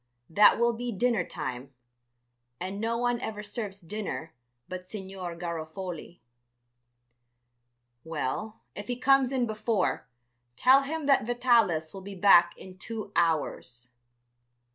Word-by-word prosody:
That 205 +7 +6
will 235 0 +3
be 240 +1 -4
dinner 230 -1 +1
time, 130 -3 -6 0.8
and 195 +3 -4
no 230 +1 0
one 245 0 0
ever 210 -3 -5
serves 205 -2 -5
dinner 175 -3 -5 0.3
but 185 0 -7
Signor 190 -4 -6
Garofoli." 170 +1 -6 1.8
"Well, 165 +7 -4
if 205 0 -7
he 245 - -1
comes 270 0 +4
in 255 -2 +1
before, 215 -3 -1 0.5
tell 260 - +6
him 305 +2 -4
that 275 -6 +3
Vitalis 230 -10 +2
will 195 - -8
be 200 +1 -8
back 175 -2 +6
in 185 -1 -12
two 220 0 -6
hours." 140 -7 -1
200 Hz, 120 wpm, -28 LUFS, 175-235 Hz, 1.8 s, That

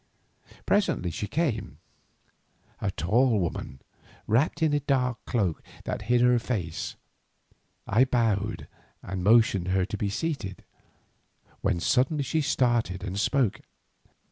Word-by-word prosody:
Presently 165 - +1
she 105 - -4
came, 140 - -2 1.0
a 100 - -1
tall 110 - +2
woman 80 -6 -4 0.4
wrapped 140 +9 +1
in 155 -2 +3
a 145 - +3
dark 125 -3 0
cloak 100 -9 0 0.2
that - - -3
hid 120 0 +4
her 125 0 +5
face. 95 -9 -3 0.9
I 115 +6 +4
bowed 110 -5 0 0.4
and 95 -1 -4
motioned 110 -3 +4
to 95 - -2
her 95 -1 +2
to 105 +1 -5
be 100 0 -1
seated, 100 - -3 1.0
when 85 - +1
suddenly 135 - +2
she 155 +4 0
started 120 -9 +1
and 100 0 -3
spoke. 115 -4 +1
115 Hz, 125 wpm, -27 LUFS, 95-130 Hz, 1.0 s, her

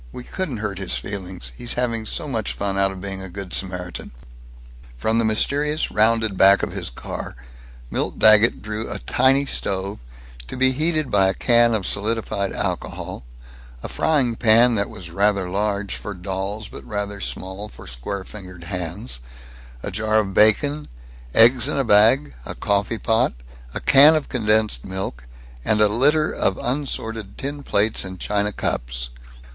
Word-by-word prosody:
We 125 - -8
couldn't 160 -4 -4
hurt 100 -2 -4
his 95 - 0
feelings. 95 -9 -6
He's 120 - -1
having 115 -3 -2
so - - -1
much 115 -6 -3
fun 100 -1 -2
out 95 0 +2
of 95 - -9
being 95 0 -4
a 95 - -7
Good 95 0 -8
Samaritan." 90 -2 -3 0.9
From 110 - +1
the - - +2
mysterious 145 +8 +1
rounded 110 -2 +2
back 100 +1 +6
of - - -2
his - - -4
car - - -7 0.6
Milt - - -2
Daggett 110 +1 +5
drew 110 +1 -5
a - - -4
tiny 135 +2 +2
stove, 100 -5 -2 0.5
to - - -6
be 130 0 +4
heated 155 +1 +1
by 95 -1 +4
a 95 - 0
can 120 -1 +4
of 100 -4 -2
solidified 105 -2 -1
alcohol, - - -3 0.6
a - - -3
frying 140 -7 +1
pan 120 +1 +5
that 100 -2 -1
was 85 -2 -9
rather 100 0 +1
large 100 +1 -2
for 105 - -7
dolls 95 +3 -4
but - - -11
rather 100 -1 -4
small 95 +3 -5
for - - -13
square 65 +12 -5
fingered 90 -4 -11
hands, 90 - -5 0.6
a - - -4
jar 110 +2 0
of 100 -3 0
bacon, 140 +9 +3 0.5
eggs 120 +3 +7
in 145 - -1
a 135 - +2
bag, 115 +6 +4
a - - -6
coffee 100 +2 0
pot, 115 +3 +1 0.4
a - - 0
can 145 +4 +7
of 155 - -2
condensed 110 - +1
milk, 95 -10 -5 0.4
and 105 - +2
a 105 - +5
litter 145 +8 +2
of 95 - 0
unsorted 115 -6 -3
tin 145 +1 -4
plates 110 -4 +1
and 95 -1 -8
china 105 0 0
cups. - - -3
105 Hz, 165 wpm, -22 LUFS, 95-120 Hz, 0.9 s, eggs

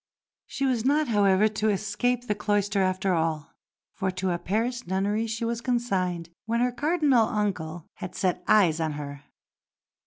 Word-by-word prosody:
She 275 - -2
was 250 -4 +1
not, 290 +2 +2
however, 205 -1 +4
to 215 0 0
escape 210 +5 0
the 210 - 0
cloister 205 -1 0
after 185 0 +1
all, 160 -3 -1 0.4
for 190 -3 -2
to 185 0 -2
a 175 - -1
Paris 235 +6 -2
nunnery 200 +4 0
she 225 +1 -3
was 235 0 -2
consigned 185 -9 -1 0.2
when 230 +1 +1
her 250 +1 +2
Cardinal 290 -4 +2
uncle 175 -6 -2
had 185 - -7
set 180 -1 -1
eyes 175 -7 +4
on 160 -2 -1
her. 145 -1 -7
205 Hz, 160 wpm, -26 LUFS, 185-235 Hz, 0.4 s, however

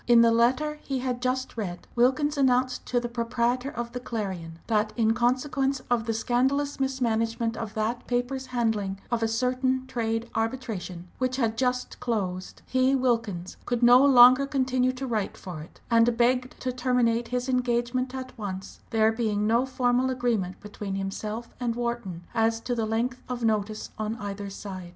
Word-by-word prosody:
In 240 -1 +7
the 230 0 +6
letter 260 +7 +2
he 270 - -3
had 250 -1 -2
just 255 +1 -1
read 185 -6 -5
Wilkins 265 +5 +3
announced 255 -2 +2
to 245 - +1
the 240 - -3
proprietor 235 +2 -1
of 240 -3 -5
the 250 - -4
Clarion 190 -9 -5
that 215 -1 +1
in 225 -2 +3
consequence 265 +3 +1
of 235 -2 +2
the 225 - +1
"scandalous 265 +5 +1
mismanagement" 230 -3 0
of 220 -2 -6
that 220 +3 -2
paper's 250 +2 -1
handling 220 -6 -1
of 235 -1 +1
a 225 - +2
certain 255 +3 0
trade 230 -2 -2
arbitration 225 -7 -3
which 255 0 0
had 230 -4 0
just 250 +1 -1
closed, 185 -6 -3
he, 260 +1 +2
Wilkins, 225 -9 -1
could 245 -1 0
no 245 +2 +8
longer 255 0 +8
continue 260 -2 +1
to 255 +1 -5
write 220 -5 -2
for 175 -5 -7
it, 155 - -14
and 230 0 +4
begged 250 +1 +1
to 255 - -1
terminate 245 -2 +1
his 250 +1 -2
engagement 250 0 0
at 260 -1 -6
once, 190 -2 -6
there 220 0 +3
being 215 -2 0
no 235 +4 +2
formal 255 0 +1
agreement 235 -8 -1
between 205 -1 -5
himself 210 +4 -4
and 240 -2 -1
Wharton 235 -8 -3
as 225 -1 +2
to 245 - -2
length 230 +2 -1
of 245 -1 -3
notice 215 -1 -1
on 215 +1 -2
either 200 -2 -5
side. 190 -2 -7
240 Hz, 170 wpm, -27 LUFS, 220-255 Hz, -, no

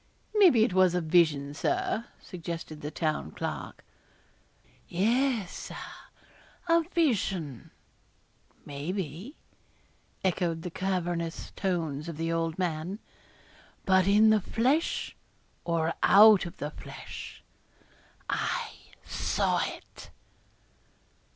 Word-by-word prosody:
'Maybe 360 - +6
it 215 - +1
was 185 -1 +4
a - - +2
vision, 155 -4 +2
Sir,' 355 - -1
suggested 165 -3 -7
the 150 - -4
Town 155 - -2
Clerk. - - -6 1.0
'Yes, 230 +3 +1
Sir; - - -7 0.9
a 335 0 +5
vision, 195 - 0 1.0
maybe,' 170 - -5 0.9
echoed 170 -3 0
the 180 - -5
cavernous 175 -3 -2
tones 165 -5 -2
of 165 - -6
the 165 +1 -1
old 165 -1 -1
man; 175 +1 -2 0.9
'but 190 -1 +4
in 215 +2 +6
the 215 -1 +4
flesh 260 - 0 0.5
or 165 -1 0
out 210 -2 +7
of 170 - -11
the 145 +1 -4
flesh, - - -9 0.8
I - - -1 0.3
saw - - 0
it.' - - -8
180 Hz, 100 wpm, -29 LUFS, 160-215 Hz, 1.0 s, out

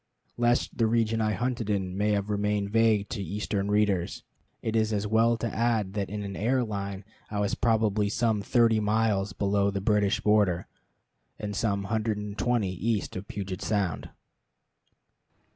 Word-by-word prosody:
Lest 120 0 +1
the 115 - +4
region 115 0 +1
I 110 -1 +1
hunted 120 +1 -2
in 95 -3 -1
may 105 +2 +1
have 100 +1 -1
remained 105 0 0
vague 110 -2 +3
to 105 - -4
Eastern 100 +1 -2
readers, 105 -4 +1 0.4
it 110 0 -1
is 110 -1 +2
as 105 -1 -1
well 115 +2 +3
to 115 -1 -3
add 110 -4 +1
that 100 -2 -2
in 105 0 -4
an 100 -1 -5
air 125 +4 +1
line 100 -3 -5 0.2
I 105 - -3
was 100 -1 0
probably 110 -3 +1
some 110 -1 +1
thirty 115 0 +3
miles 105 -2 +1
below 100 0 +1
the 100 0 -2
British 100 0 +2
border, 105 -5 +2 0.7
and 105 -1 -5
some 100 -1 0
hundred 110 +1 -1
and 105 -1 -5
twenty 115 -5 0
east 105 +3 -2
of 95 +2 -6
Puget 95 -2 -5
Sound. 100 -7 -1
105 Hz, 165 wpm, -28 LUFS, 100-110 Hz, 0.7 s, the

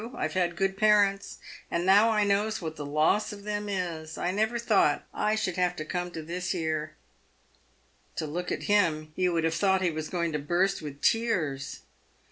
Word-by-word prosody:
I've - - -2
had 175 -2 0
good 195 +1 0
parents, 205 -2 +3 0.3
and 170 +1 -1
now 205 +4 +6
I 215 -2 +2
knows 205 +2 +1
what 160 -3 -5
the 150 - -6
loss 155 +10 +2
of 205 -1 -9
them 210 0 -3
is. 165 -5 -4
I 175 - -1
never 220 +4 0
thought 215 -10 +2
I 215 +1 +1
should 185 -5 -2
have 180 -1 +1
come 180 -1 -2
to 165 -2 -7
this 180 +3 -3
here." 155 -3 -2 1.2
To - - -2
look 175 +4 -4
at - - -3
him, 155 -7 +1
you 180 -1 +1
would 165 -1 0
have 165 0 +1
thought 190 +2 +2
he 175 - +2
was 155 0 -5
going 170 -2 -1
to 150 - -2
burst 175 +6 0
with 145 -2 -8
tears. 175 - 0
180 Hz, 190 wpm, -28 LUFS, 160-205 Hz, 1.2 s, now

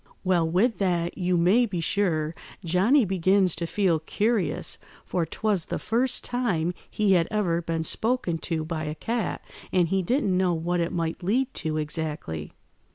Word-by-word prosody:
"Well, 175 -3 +2
with 210 +8 +2
that, 175 -3 0
you 180 -1 +1
may 200 +9 +4
be 185 -5 -3
sure, 165 -3 0 0.3
Johnny 205 - +4
begins 190 0 +2
to 170 - -2
feel 180 -4 +1
curious, 180 -1 0 0.3
for 170 -3 -1
'twas 200 -1 0
the - - -3
first 245 +3 0
time 185 -9 0 0.2
he 210 -2 +1
had 175 -3 +4
ever 185 -6 0
been 165 -1 -2
spoken 220 -4 0
to 160 -2 -2
by 160 -1 -3
a 150 0 -4
cat, 225 +5 -3 0.3
and 175 -3 +2
he 195 +1 +1
didn't 200 -1 +1
know 180 -2 +2
what 175 +2 -1
it 170 0 0
might 165 0 -2
lead 250 +9 0
to 155 -2 -2
exactly. 150 - -3
180 Hz, 165 wpm, -26 LUFS, 165-205 Hz, 0.3 s, may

